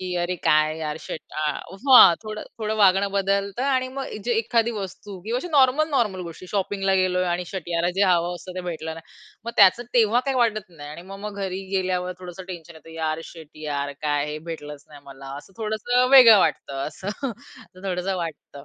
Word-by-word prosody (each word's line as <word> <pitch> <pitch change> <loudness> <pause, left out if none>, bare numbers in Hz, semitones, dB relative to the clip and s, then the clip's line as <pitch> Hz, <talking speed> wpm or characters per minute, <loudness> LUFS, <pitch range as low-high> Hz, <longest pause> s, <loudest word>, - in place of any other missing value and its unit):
की 185 -1 -4
अरे 175 +1 -1
काय 155 +1 +3
यार 150 -1 -3
शीट - - -6
हां, 190 - +5
थोडं 215 -1 -6 0.2
थोडं 215 0 -2
वागणं 195 -1 +4
बदलतं 200 +3 0
आणि 260 -2 +1
मग 270 +1 -5 0.2
जे 240 - 0
एखादी 230 +1 +1
वस्तू 200 -1 -7
किंवा 230 +3 -1
अशी 355 - -6
नॉर्मल, 290 0 +3
नॉर्मल 215 -10 0
गोष्टी 170 +1 -9
शॉपिंगला 195 -1 0
गेलोय 185 -1 +2
आणि 175 +1 -1
शिट 185 -3 -7
यार 170 0 0
जे 200 - +3
हवं 175 -1 +2
असतं 180 +1 -9
ते - - -2
भेटलं 160 -2 -5
नाही. 165 - -10 0.4
मग 235 - -3
त्याचं 200 +4 +6
तेव्हा 235 +1 +4
काही 270 -1 0
वाटत 215 -5 0
नाही 145 -3 -11
आणि 170 +3 -9
मग 195 - -8
मग 210 -1 -6
घरी 190 0 -3
गेल्यावर 185 -1 -1
थोडंसं 180 0 -9
टेन्शन 170 -2 -9
येतं 160 +1 -15
यार 160 0 -2
शिट 160 -3 -12 0.2
यार 140 -1 -2
काय 145 -1 0
हे 155 - -5
भेटलंच 150 -3 -7
नाही 145 -1 -13
मला, 135 0 -12
असं 145 +7 -12
थोडंसं 230 +3 +1
वेगळं 245 -6 +9
वाटतं 140 -5 -1
असं. 185 +5 -7 0.2
असं 185 -3 -15
थोडंसं 185 0 -2
वाटतं. 160 -4 -7
185 Hz, 195 wpm, -24 LUFS, 165-215 Hz, 0.4 s, वेगळं